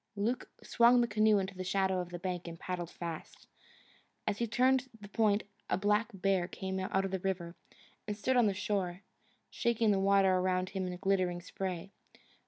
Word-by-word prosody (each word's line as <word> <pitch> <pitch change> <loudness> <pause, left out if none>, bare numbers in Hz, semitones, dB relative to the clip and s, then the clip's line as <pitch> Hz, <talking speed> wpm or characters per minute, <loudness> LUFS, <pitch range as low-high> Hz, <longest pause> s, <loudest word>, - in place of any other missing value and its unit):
Luke 225 +5 -1
swung 240 +1 +5
the 240 - +2
canoe 215 -1 +4
into 195 0 -2
the 185 0 -5
shadow 190 0 +1
of 180 -1 -4
the 175 - -5
bank 180 -1 -4
and 165 -1 -7
paddled 175 -2 -4
fast. 170 -3 -7 0.8
As 205 -1 -1
he 235 - 0
turned 255 +3 +2
the 205 - -10
point 210 0 +2 0.3
a - - +2
black 210 +3 +2
bear 195 -2 +1
came 190 0 -4
out 190 +1 0
of 195 - -3
the 190 - -1
river, 180 -2 -3 0.5
and 210 -1 -3
stood 260 +5 +1
on 240 -3 +5
the 200 - +1
shore, 195 -2 -2 0.5
shaking 235 -2 +2
the 195 - +2
water 195 -1 +4
around 185 0 0
him 190 -1 -3
in 180 0 -5
glittering 185 -2 +1
spray. 185 +1 -5
195 Hz, 190 wpm, -32 LUFS, 185-210 Hz, 0.8 s, swung